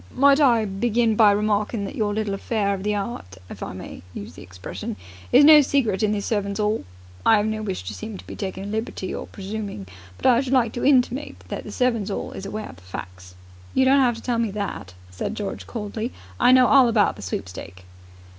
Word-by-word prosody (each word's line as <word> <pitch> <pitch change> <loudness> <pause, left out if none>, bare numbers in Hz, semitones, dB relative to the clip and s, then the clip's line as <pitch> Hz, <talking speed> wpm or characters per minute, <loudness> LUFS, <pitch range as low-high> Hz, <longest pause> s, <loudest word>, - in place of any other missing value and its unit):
"Might 280 +1 +5
I 235 -6 +4
begin 225 +3 +1
by 215 -1 +6
remarking 210 +1 0
that - - -6
your 215 -5 0
little 210 -1 -2
affair 200 0 -1
of 195 - -4
the 210 +1 0
'eart, 195 - -5
if - - -9
I - - -4
may - - -9
use 100 - -7
the - - -12
expression, 90 0 -7 0.4
is 285 - +7
no 305 0 +9
secret 255 -8 +1
in 210 -1 +2
the 210 -1 -1
Servants' 200 -1 -2
'All? 210 +1 0 0.4
I 225 - +6
'ave 205 +1 +1
no 215 0 -3
wish 195 -4 -4
to - - -6
seem 215 -2 -7
to - - -13
be - - -8
taking 190 -1 -5
a - - -6
liberty 215 -2 -4
or - - -5
presuming, 200 - -6 0.3
but - - -10
I 250 -1 +5
should 270 -1 -3
like 240 -4 +3
to 240 - -4
intimate 265 0 +2
that - - -5
the - - -7
Servants' 230 -5 0
'All 200 - -4
is 195 - -7
aware 215 +2 -5
of - - -12
the - - -17
facts." 90 0 -9 0.4
"You 260 - +4
don't 275 +2 +5
have 245 -3 +3
to 230 - -11
tell 240 -2 0
me 230 -2 +1
that," 195 - -5 0.2
said 90 - -4
George 205 -2 -5
coldly. 220 +1 -4 0.3
"I - - +6
know 255 0 +7
all 265 0 +6
about 220 -3 +2
the - - -11
sweepstake." 90 -1 -6
215 Hz, 225 wpm, -23 LUFS, 195-240 Hz, 0.4 s, no